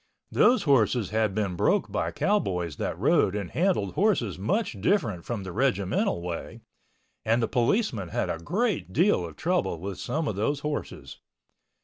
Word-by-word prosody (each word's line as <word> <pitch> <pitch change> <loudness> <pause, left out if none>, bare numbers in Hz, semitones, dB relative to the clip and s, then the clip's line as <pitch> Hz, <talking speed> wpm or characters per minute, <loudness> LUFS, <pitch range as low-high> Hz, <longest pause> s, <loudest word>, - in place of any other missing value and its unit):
Those 250 +1 +4
horses 120 - +2
had 110 -3 +1
been 100 -4 -1
broke - - +1
by - - -1
cowboys 90 - 0
that - - -3
rode 95 - +2
and 100 -4 -4
handled 170 - +1
horses 150 - +1
much 125 - -1
different 115 - 0
from 115 -5 -4
the 95 - -6
regimental 100 -7 0
way 85 -1 -6 0.6
and 115 +2 +2
the 115 - +1
policemen 120 - 0
had - - -1
a 80 - -3
great 190 - -1
deal 170 - +3
of 80 -3 -7
trouble 175 - -1
with 95 +2 -6
some 155 0 -2
of 105 - -2
those 140 +8 -1
horses. 150 0 -5
110 Hz, 160 wpm, -27 LUFS, -, 0.6 s, Those